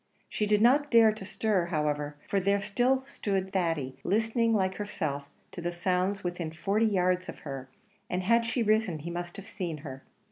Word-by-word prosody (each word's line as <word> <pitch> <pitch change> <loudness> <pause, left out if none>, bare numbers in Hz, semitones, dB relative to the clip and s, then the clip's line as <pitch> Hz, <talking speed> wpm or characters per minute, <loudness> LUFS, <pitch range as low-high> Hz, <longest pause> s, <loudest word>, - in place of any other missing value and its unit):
She 210 - -1
did 210 +1 +3
not 285 +5 +5
dare 230 -3 +7
to 215 -2 -8
stir, 195 -2 0
however, 150 -2 -1
for 200 - +1
there 200 +2 +2
still 250 +6 +1
stood 195 -8 -2
Thady, 165 -8 -1
listening 225 +3 +1
like 190 -3 +1
herself 155 -9 -3 0.3
to 175 - -7
the 175 +1 -1
sounds 185 +3 0
within 175 -2 -3
forty 200 +7 +1
yards 185 -2 +1
of - - -8
her; 135 -3 -6 0.4
and 180 +1 -1
had 230 +4 +4
she 235 +1 0
risen 215 -5 +2
he 165 +3 -6
must 175 +2 -5
have 200 - -8
seen 175 -6 -4
her. 135 -1 -7
190 Hz, 185 wpm, -29 LUFS, 170-215 Hz, 0.4 s, dare